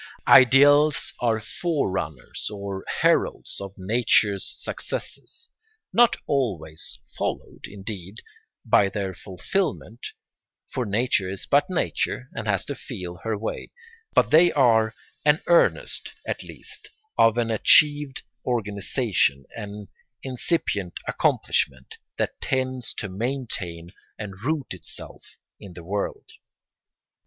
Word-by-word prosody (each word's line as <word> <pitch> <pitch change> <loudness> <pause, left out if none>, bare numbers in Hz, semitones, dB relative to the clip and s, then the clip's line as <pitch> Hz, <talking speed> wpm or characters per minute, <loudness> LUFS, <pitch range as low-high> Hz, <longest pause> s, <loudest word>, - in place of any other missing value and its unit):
Ideals 145 +3 +6
are 115 -2 +1
forerunners 95 - -3
or 100 -2 -5 0.2
heralds - - +2
of 100 0 -7
nature's 105 0 +1
successes, 465 - -6 0.4
not 240 0 +5
always 90 - -2 0.2
followed, - - -4
indeed, 100 -1 -8 0.5
by 105 -3 +4
their 95 -2 -3
fulfilment, 110 - -3 0.7
for 125 -3 -3
nature 105 -2 +1
is 95 0 -5
but 145 +7 +3
nature 135 -7 -1
and 115 -2 -5
has 100 -2 +1
to 140 - -3
feel 90 -10 -7
her 110 +2 -3
way; 110 - -5 0.5
but - - +4
they 170 +3 +7
are 115 -5 +4 0.3
an 150 0 +3
earnest, 170 -1 +2
at - - -2
least, - - -9 0.3
of 115 0 +4
an 115 -1 +1
achieved 145 +5 +5 0.2
organisation, 105 - 0
an 105 -2 -7 0.4
incipient 125 - -2
accomplishment, 65 0 0 0.2
that - - -2
tends 130 -2 0
to 105 - -4
maintain 95 -6 -4 0.3
and 105 -2 -6
root 145 -3 -1
itself 90 - -9 0.2
in 95 -3 -11
the 85 - -9
world. 100 +4 -4
110 Hz, 110 wpm, -24 LUFS, 95-135 Hz, 0.7 s, they